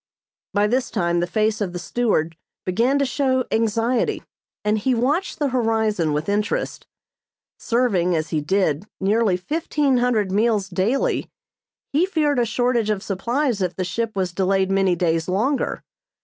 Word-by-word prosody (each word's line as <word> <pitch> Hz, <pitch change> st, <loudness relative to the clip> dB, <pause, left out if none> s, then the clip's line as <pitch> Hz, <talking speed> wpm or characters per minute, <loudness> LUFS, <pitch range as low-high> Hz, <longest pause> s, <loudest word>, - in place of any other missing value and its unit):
By 205 Hz, 0 st, +2 dB
this 245 Hz, +4 st, 0 dB
time 175 Hz, -4 st, 0 dB
the 175 Hz, -, 0 dB
face 215 Hz, +3 st, 0 dB
of 185 Hz, -4 st, -2 dB
the -, -, -3 dB
steward 175 Hz, -4 st, 0 dB, 0.3 s
began 235 Hz, +9 st, +2 dB
to 280 Hz, -, +2 dB
show 260 Hz, -1 st, 0 dB
anxiety 225 Hz, +2 st, 0 dB, 0.4 s
and 210 Hz, +1 st, +2 dB
he 255 Hz, +4 st, +1 dB
watched 285 Hz, +11 st, 0 dB
the 290 Hz, -2 st, 0 dB
horizon 220 Hz, -8 st, +1 dB
with 150 Hz, +1 st, -2 dB
interest. 205 Hz, +1 st, -2 dB, 0.7 s
Serving, 205 Hz, -8 st, +1 dB
as 155 Hz, 0 st, -2 dB
he 155 Hz, -2 st, 0 dB
did, 185 Hz, +1 st, 0 dB
nearly 205 Hz, -1 st, +2 dB
fifteen 290 Hz, -, 0 dB
hundred 230 Hz, -6 st, +1 dB
meals 210 Hz, -1 st, +1 dB
daily, 200 Hz, +9 st, 0 dB, 0.6 s
he 330 Hz, +6 st, +3 dB
feared 300 Hz, -7 st, +1 dB
a 240 Hz, -, +3 dB
shortage 235 Hz, -1 st, 0 dB
of 210 Hz, -2 st, -1 dB
supplies 235 Hz, +4 st, -1 dB
if 180 Hz, -2 st, -1 dB
the 185 Hz, -, -2 dB
ship 225 Hz, +4 st, -3 dB
was 185 Hz, -2 st, -1 dB
delayed 190 Hz, +1 st, +1 dB
many 195 Hz, -2 st, +2 dB
days 165 Hz, -1 st, 0 dB
longer. 245 Hz, +10 st, 0 dB
215 Hz, 155 wpm, -22 LUFS, 185-245 Hz, 0.7 s, he